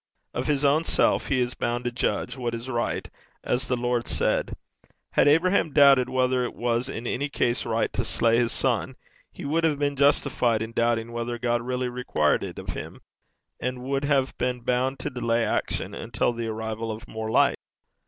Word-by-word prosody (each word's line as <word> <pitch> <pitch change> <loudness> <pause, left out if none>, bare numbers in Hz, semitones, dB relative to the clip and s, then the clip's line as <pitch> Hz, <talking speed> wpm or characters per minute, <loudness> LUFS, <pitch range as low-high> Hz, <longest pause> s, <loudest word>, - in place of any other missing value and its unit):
Of 125 +2 -3
his 145 -1 +1
own 145 +3 +4
self - - +2
he 130 - +1
is 125 0 0
bound 120 +1 -2
to 120 - -1
judge 120 - -1
what 120 -3 -3
is 115 +2 -7
right, 120 -1 -2 0.4
as 130 +2 -1
the 125 - 0
Lord 120 0 -1
said. - - 0 0.6
Had - - +3
Abraham 165 +1 +3
doubted 140 -3 +6
whether 130 0 +1
it 120 - -4
was 120 +2 0
in 120 -3 -5
any 140 +4 -1
case 120 -4 0
right 115 0 0
to - - -1
slay 115 0 +2
his 120 -1 +1
son, 130 0 +1 0.4
he - - -9
would 160 +4 0
have 155 -3 +2
been 145 0 0
justified 130 -5 +2
in 110 - -6
doubting 115 0 0
whether 120 0 -3
God 120 0 0
really 125 +1 -2
required 120 -11 0
it - - -6
of - - -7
him, - - -7 0.6
and 125 0 -3
would 135 +2 -1
have 135 -2 +1
been 125 0 -1
bound 125 +3 0
to - - -4
delay 115 -2 0
action - - -1
until 120 - -1
the 115 -1 -4
arrival 110 0 -4
of 110 +1 -8
more 110 0 -5
light. - - +3
125 Hz, 195 wpm, -25 LUFS, 115-135 Hz, 0.6 s, doubted